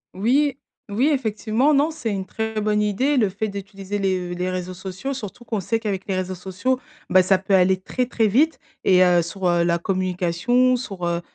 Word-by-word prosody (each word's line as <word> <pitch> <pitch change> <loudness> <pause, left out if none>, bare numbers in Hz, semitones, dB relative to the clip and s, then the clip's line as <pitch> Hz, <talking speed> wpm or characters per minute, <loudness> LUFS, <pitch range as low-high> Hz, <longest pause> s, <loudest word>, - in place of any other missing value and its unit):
Oui, 265 +8 +2 0.3
oui, 240 +9 +2
effectivement, 230 +3 +1
non 290 +4 +3
c'est 305 -8 -4
une 195 -2 -3
très 220 +2 -3
bonne 210 0 +1
idée 250 +8 +1
le 215 -5 +3
fait 215 +3 -3
d'utiliser 200 0 -6
les 185 -2 -1
v 175 - -4
les 180 +1 -2
réseaux 185 0 -4
sociaux 190 +8 -5
surtout 240 -1 -8
qu'on 220 -2 -2
sait 225 +4 -1
qu'avec 205 -4 -3
les 195 - -1
réseaux 185 0 -2
sociaux, 190 +8 -2 0.3
ben, 185 - +7
ça 185 +1 +3
peut 195 +1 -2
aller 190 0 +4
très, 250 +6 -2
très 230 -2 +1
vite 280 +10 +3 0.3
et 185 -1 +5
heu, 175 -1 +4
sur 180 +3 -3
heu, 170 0 +2
la 170 0 +2
communication, 185 +7 +1
sur, 195 -8 -5
heu 170 0 -1
200 Hz, 205 wpm, -22 LUFS, 185-235 Hz, 0.3 s, ben